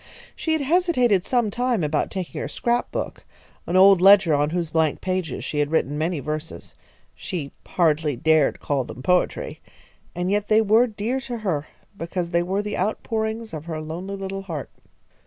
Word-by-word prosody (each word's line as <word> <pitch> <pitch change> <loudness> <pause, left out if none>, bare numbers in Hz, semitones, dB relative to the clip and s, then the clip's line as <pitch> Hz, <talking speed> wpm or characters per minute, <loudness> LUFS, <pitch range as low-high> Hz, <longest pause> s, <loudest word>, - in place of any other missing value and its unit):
She 320 - -1
had 315 -2 0
hesitated 265 - +2
some 240 -5 +1
time 245 -5 0
about 150 0 0
taking 180 -8 -5
her - - -3
scrap 240 +10 -1
book, - - -4 0.4
an 175 - -1
old 195 -1 +7
ledger 195 -4 +7
on 145 +1 +2
whose 170 -1 -2
blank 160 -2 +1
pages 185 -6 -3
she 150 - -3
had 145 -1 +1
written 150 -2 0
many 160 +2 -1
verses. 155 +3 -6 0.4
She 160 -8 -5 0.2
hardly 155 -4 +1
dared 155 +2 +2
call 140 -2 -1
them 125 +1 -10
poetry, 180 +3 0 0.5
and 180 +2 -1
yet 205 0 0
they 215 0 +5
were 220 +4 +4
dear 225 +4 -2
to 250 -2 -5
her, 170 -9 -2 0.3
because 170 -1 -4
they 170 - +2
were 190 +4 -1
the 210 0 -3
outpourings 220 +2 -2
of 155 -1 -6
her 160 -2 -4
lonely 170 +6 -5
little 195 0 -5
heart. 165 -8 -6
185 Hz, 175 wpm, -23 LUFS, 155-215 Hz, 0.5 s, old